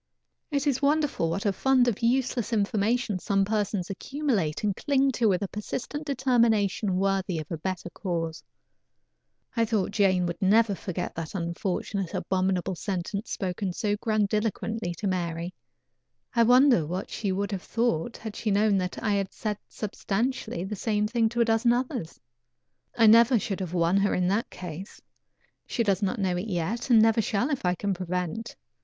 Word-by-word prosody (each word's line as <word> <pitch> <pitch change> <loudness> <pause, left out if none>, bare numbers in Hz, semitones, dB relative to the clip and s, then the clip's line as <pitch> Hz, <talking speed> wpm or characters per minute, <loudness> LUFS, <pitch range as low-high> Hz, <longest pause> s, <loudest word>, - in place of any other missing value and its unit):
It 285 -2 -1
is 275 -2 +1
wonderful 290 - +1
what 185 +6 -2
a 200 - +2
fund 260 +3 +3
of 230 -4 0
useless 245 -1 +1
information 215 0 +1
some 195 +1 +1
persons 205 -3 -1
accumulate 210 - -1
and 205 -2 +1
cling 275 -2 +2
to 235 -4 +2
with 190 +1 +1
a - - -1
persistent 260 +9 -5
determination 230 -7 +2
worthy 195 -2 0
of 155 +1 -6
a 165 - -2
better 185 0 -4
cause. 165 -4 -3 1.1
I 230 - +3
thought 215 -4 0
Jane 190 -4 +2
never 215 +3 +4
would - - -8
forget 185 - -4
that 165 +2 -6
unfortunate, 185 +2 -3
abominable 185 0 0
sentence 195 +3 -4
spoken 185 0 -2
so 205 +2 0
grandiloquently 215 -2 -1
to 205 - -6
Mary. 175 -2 -2 0.8
I 235 - +3
wonder 245 - +5
what 180 +4 -4
she 205 -3 -2
would 200 +2 -2
have 195 -2 -3
thought 230 -2 -1
had 220 -2 -7
she 220 - -2
known 205 0 +3
that 180 -1 -4
I 215 - +1
had 195 -1 -1
said 210 -2 -4
substantially 215 -1 -2
the 205 +3 -4
same 210 +1 0
thing 230 0 +1
to 235 +1 0
a - - +5
dozen 225 +1 +3
others. 245 - -3 0.8
I 230 - +6
never 230 +3 +7
should 205 -3 -3
have 180 -2 -4
won 170 +2 +3
her 200 +1 +2
in 180 0 +1
that 220 +7 0
case. 180 +2 -8 0.7
She 235 - 0
does 200 -2 +1
not 205 +4 0
know 185 -2 +1
it 185 +5 -3
yet, 205 +7 -2
and 235 -3 +7
never 225 +1 +4
shall 220 +7 0
if 275 - -2
I 180 - +2
can 200 +2 -1
prevent. 180 +4 -3
205 Hz, 175 wpm, -27 LUFS, 185-230 Hz, 1.1 s, never